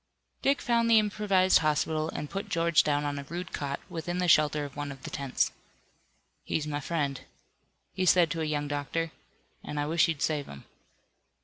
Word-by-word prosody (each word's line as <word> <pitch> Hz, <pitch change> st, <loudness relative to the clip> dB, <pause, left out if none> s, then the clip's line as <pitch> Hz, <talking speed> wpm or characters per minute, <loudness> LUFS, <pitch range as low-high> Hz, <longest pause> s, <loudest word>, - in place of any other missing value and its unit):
Dick 275 Hz, +1 st, +2 dB
found 235 Hz, -1 st, +2 dB
the 230 Hz, -, +7 dB
improvised 205 Hz, -3 st, +3 dB
hospital, 155 Hz, 0 st, 0 dB
and 150 Hz, -, -5 dB
put 195 Hz, +1 st, -4 dB
George 170 Hz, 0 st, +3 dB
down 145 Hz, 0 st, 0 dB
on 145 Hz, -1 st, -2 dB
a -, -, -6 dB
rude 175 Hz, +5 st, -6 dB
cot, 140 Hz, -1 st, -3 dB
within 175 Hz, +2 st, -4 dB
the 180 Hz, 0 st, 0 dB
shelter 150 Hz, -2 st, +4 dB
of 140 Hz, -, -10 dB
one 145 Hz, -1 st, -4 dB
of 135 Hz, -2 st, -11 dB
the -, -, -7 dB
tents. 140 Hz, -2 st, 0 dB, 0.9 s
"He's 155 Hz, -, -2 dB
my 145 Hz, -1 st, -2 dB
friend," 145 Hz, -2 st, -2 dB, 0.7 s
he 185 Hz, 0 st, -1 dB
said 175 Hz, -3 st, +5 dB
to 165 Hz, -, -2 dB
a -, -, 0 dB
young 145 Hz, -1 st, -1 dB
doctor, 145 Hz, +3 st, -2 dB, 0.5 s
"and 150 Hz, -, -4 dB
I 145 Hz, -, 0 dB
wish 160 Hz, +3 st, +3 dB
you'd 160 Hz, -4 st, -2 dB
save 150 Hz, -3 st, -1 dB
him." 70 Hz, -1 st, -10 dB
155 Hz, 190 wpm, -29 LUFS, 145-175 Hz, 0.9 s, the